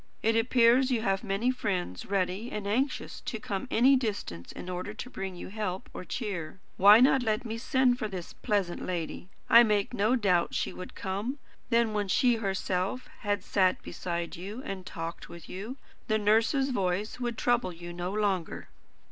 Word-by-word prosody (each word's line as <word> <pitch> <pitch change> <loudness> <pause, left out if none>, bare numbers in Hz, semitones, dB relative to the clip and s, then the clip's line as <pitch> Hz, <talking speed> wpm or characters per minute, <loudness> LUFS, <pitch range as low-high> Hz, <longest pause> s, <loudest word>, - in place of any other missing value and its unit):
It 225 +1 +3
appears 240 +2 +4
you 235 -4 0
have 195 -3 0
many 205 +6 +1
friends 185 - -3
ready 195 +4 -1
and 210 -1 -4
anxious 255 +8 -1
to 240 -7 -4
come 205 +4 -4
any 260 +4 +5
distance 205 - -3
in - - -8
order 185 +3 -4
to 250 - -7
bring 190 -4 -5
you 175 - -8
help 195 -3 -4
or - - -6
cheer. 185 -3 -4 0.2
Why 205 +3 +8
not 265 +1 +5
let 220 0 0
me 225 0 -4
send 250 0 +2
for 215 - -1
this 185 -4 -7
pleasant 195 -5 -1
lady? 175 0 -4 0.2
I 235 - +9
make 210 -1 +2
no 220 +2 +2
doubt 185 -7 +2
she - - -1
would 185 - -9
come. 205 +8 -3 0.3
Then 230 -2 +3
when 205 -1 0
she 240 +4 +3
herself 195 +4 -2
had 205 -3 -1
sat 185 -3 +2
beside 170 -1 -4
you, 205 +9 -7
and 190 -1 -6
talked 165 0 -6
with 170 - -11
you, 215 +8 -6 0.3
the 215 - +2
nurse's 225 +6 +3
voice 195 0 -1
would 240 -2 -2
trouble 240 -6 +1
you 175 0 -8
no 175 +1 -3
longer." 200 -5 -1
205 Hz, 180 wpm, -29 LUFS, 185-235 Hz, 0.3 s, I